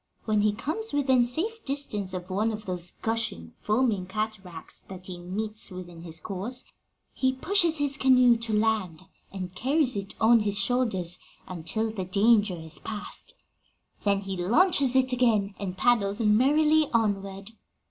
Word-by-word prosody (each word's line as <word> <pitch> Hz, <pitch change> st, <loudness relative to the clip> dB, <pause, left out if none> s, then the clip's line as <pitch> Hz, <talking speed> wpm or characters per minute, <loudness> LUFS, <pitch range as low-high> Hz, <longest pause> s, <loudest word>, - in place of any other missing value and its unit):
When 215 Hz, -2 st, +2 dB
he 210 Hz, 0 st, +2 dB
comes 315 Hz, -, -4 dB
within 265 Hz, -3 st, +3 dB
safe 405 Hz, -, -2 dB
distance 240 Hz, -9 st, -2 dB
of 180 Hz, +1 st, -7 dB
one 215 Hz, +4 st, 0 dB
of 215 Hz, 0 st, -7 dB
those 180 Hz, -1 st, -1 dB
gushing, 220 Hz, -, -1 dB
foaming 215 Hz, -4 st, 0 dB
cataracts 195 Hz, -4 st, -5 dB
that 185 Hz, -1 st, -11 dB
he 180 Hz, -2 st, -7 dB
meets 210 Hz, +5 st, -3 dB
with 185 Hz, -2 st, -8 dB
in 170 Hz, -1 st, -12 dB
his 165 Hz, -1 st, -7 dB
course, 205 Hz, +8 st, -3 dB, 0.5 s
he 260 Hz, 0 st, +1 dB
pushes 340 Hz, +3 st, +3 dB
his 285 Hz, -2 st, 0 dB
canoe 255 Hz, -2 st, +5 dB
to 230 Hz, -1 st, -2 dB
land 210 Hz, -6 st, 0 dB, 0.3 s
and 185 Hz, -2 st, -6 dB
carries 265 Hz, -, +1 dB
it 200 Hz, 0 st, -5 dB
on 230 Hz, +1 st, +5 dB
his 205 Hz, -1 st, -1 dB
shoulders 195 Hz, -6 st, +1 dB, 0.3 s
until 185 Hz, +6 st, -3 dB
the 195 Hz, -4 st, -4 dB
danger 205 Hz, +1 st, +3 dB
is 160 Hz, -1 st, -3 dB
past; 225 Hz, -, -7 dB, 0.7 s
then 200 Hz, -1 st, +1 dB
he 195 Hz, -1 st, -5 dB
launches 265 Hz, -, +3 dB
it 260 Hz, 0 st, +3 dB
again, 225 Hz, -5 st, +2 dB
and 185 Hz, -2 st, -5 dB
paddles 210 Hz, -4 st, +2 dB
merrily 295 Hz, +8 st, +3 dB
onward. 200 Hz, -2 st, -1 dB
215 Hz, 155 wpm, -27 LUFS, 190-250 Hz, 0.7 s, canoe